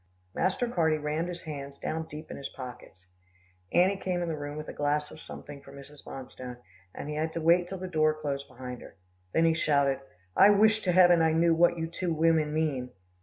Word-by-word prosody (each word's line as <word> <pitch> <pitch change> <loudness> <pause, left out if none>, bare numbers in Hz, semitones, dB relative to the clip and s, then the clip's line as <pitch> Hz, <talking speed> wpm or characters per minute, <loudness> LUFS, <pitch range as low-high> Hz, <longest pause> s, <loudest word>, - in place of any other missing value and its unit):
Master 190 +6 0
Carty 160 -8 +2
rammed 150 +3 -2
his 175 -1 -6
hands 140 -3 -7
down 160 0 -3
deep 155 +1 -9
in - - -6
his 140 - -5
pockets. 125 -7 -10 0.7
Annie 185 +3 +4
came 180 -2 -2
in 170 - -3
the 160 - -1
room 145 0 -6
with 155 - -6
a - - -6
glass 150 0 -1
of - - -11
something 145 -2 -10
for 140 - -14
Mrs. 140 +1 -12
Bonstone, 125 -1 -8 0.4
and - - -6
he 150 - -3
had 160 +1 -2
to - - -2
wait 170 +2 +4
till 190 - -5
the 185 0 -5
door 155 -3 +2
closed 140 -2 -3
behind 125 -1 -8
her. - - -13 0.4
Then 165 - +3
he 165 - +4
shouted, 140 -4 +2 0.4
"I 200 - +8
wish 215 +1 +5
to 180 - +3
heaven 175 -1 +6
I 160 -1 +3
knew 165 +1 +4
what 170 +1 +4
you 165 - -1
two 170 +2 -3
women 160 -1 +3
mean." 150 -5 -1
155 Hz, 220 wpm, -29 LUFS, 145-170 Hz, 0.7 s, I